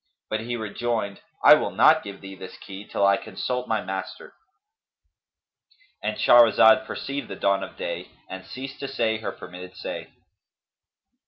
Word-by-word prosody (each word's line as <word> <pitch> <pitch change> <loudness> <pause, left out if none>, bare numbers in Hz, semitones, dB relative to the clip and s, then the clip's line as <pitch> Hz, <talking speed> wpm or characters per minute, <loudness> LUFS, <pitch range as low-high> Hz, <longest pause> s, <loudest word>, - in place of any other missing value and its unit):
But 110 - 0
he 120 +2 -4
rejoined, 110 -2 -3 0.2
'I - - +10
will - - -2
not - - +5
give 100 -1 -9
thee 95 0 -9
this 95 -1 -10
key 100 +1 -10
till 100 - +1
I 100 0 +4
consult 125 0 -4
my 110 -2 0
master,'"—And 410 - -10
Shahrazad 120 +1 +6
perceived 140 -2 -5
the - - -7
dawn 100 0 +1
of - - -9
day - - -5 0.2
and 95 0 -8
ceased 135 +2 -8
to 140 - -4
say 115 -5 -1
her 110 - -4
permitted 90 +1 -11
say. - - -6
110 Hz, 150 wpm, -25 LUFS, 100-125 Hz, 0.2 s, I